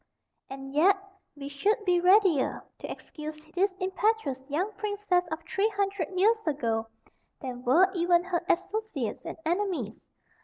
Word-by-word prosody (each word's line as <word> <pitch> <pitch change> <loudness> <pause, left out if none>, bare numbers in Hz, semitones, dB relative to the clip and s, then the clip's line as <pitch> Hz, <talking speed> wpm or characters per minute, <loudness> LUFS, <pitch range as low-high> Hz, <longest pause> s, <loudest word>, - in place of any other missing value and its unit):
And 270 0 -8
yet 370 +7 +5 0.4
we 280 -1 -7
should 410 - 0
be 355 -2 +4
readier 365 -6 +4 0.2
to - - -6
excuse 305 0 -8
this 385 +2 +2
impetuous 370 - 0
young 355 +9 0
princess 410 -3 0
of 320 +1 -4
three 395 +6 +1
hundred 400 -5 -1
years 440 +4 +5
ago 230 -7 0 0.5
than 250 -3 -6
were 320 +10 +5
even 345 -1 +3
her 355 -2 -1
associates 360 - -1
and - - -6
enemies. 340 - -1
350 Hz, 140 wpm, -28 LUFS, 285-400 Hz, 0.5 s, yet